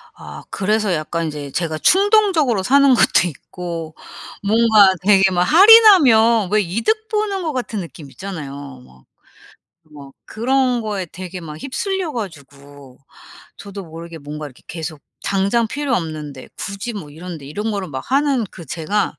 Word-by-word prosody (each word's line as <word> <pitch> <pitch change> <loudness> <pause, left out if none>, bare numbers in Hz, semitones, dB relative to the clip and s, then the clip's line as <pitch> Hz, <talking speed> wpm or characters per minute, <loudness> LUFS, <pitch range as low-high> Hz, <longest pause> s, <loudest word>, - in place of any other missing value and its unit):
아 - - -11
그래서 210 0 0
약간 165 +1 -2
이제 150 -2 -6
제가 160 +1 -2
충동적으로 380 - +3
사는 275 +4 +5
것도 180 - +3
있고. 165 0 -7 0.5
뭔가 215 -2 +5
되게 195 -1 +4
막 180 0 +2
할인하면 295 - +6
왜 215 0 +3
이득 230 - -1
보는 420 -3 -1
거 315 - -3
같은 240 -4 -4
느낌 165 -5 -9
있잖아요. 140 -8 -8
막 65 0 -21 0.9
뭐 140 -2 -12
그런 250 +1 0
거에 205 -4 -4
되게 180 +2 -8
막 155 -2 -9
휩쓸려 380 - -3
가지고 145 - -10 0.6
저도 200 -1 -9
모르게 165 0 -10
뭔가 150 +1 -7
이렇게 130 -3 -16
계속 160 -2 -7 0.2
당장 200 +4 0
필요 285 -1 -2
없는데 155 - -5
굳이 200 +4 -5
뭐 195 -8 -8
이런데 160 -1 -9
이런 210 +10 -4
거를 200 -3 -3
막 130 -3 -6
하는 275 -3 +2
그 170 - -12
제가 175 +8 -2
195 Hz, 295 characters per minute, -19 LUFS, 155-240 Hz, 0.9 s, 할인하면